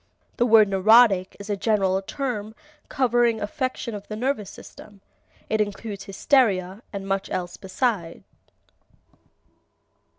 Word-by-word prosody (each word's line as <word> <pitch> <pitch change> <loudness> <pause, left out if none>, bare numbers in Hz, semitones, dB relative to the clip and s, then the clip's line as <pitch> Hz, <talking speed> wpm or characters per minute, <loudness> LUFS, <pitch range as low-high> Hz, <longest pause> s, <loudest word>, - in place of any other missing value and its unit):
The 240 - +2
word 220 -2 +6
neurotic 195 0 +4
is 200 - -9
a 205 - -1
general 195 -2 +1
term 220 -2 -4 0.3
covering 240 -3 +2
affection 235 +2 -3
of 205 -1 -8
the 215 - -6
nervous 220 -4 -2
system. 205 0 -14 0.5
It 220 0 0
includes 205 -1 -5
hysteria 195 -3 +1
and 195 -1 -6
much 195 0 -2
else 180 -1 -4
beside. 190 -3 -3
210 Hz, 120 wpm, -24 LUFS, 195-230 Hz, 0.5 s, word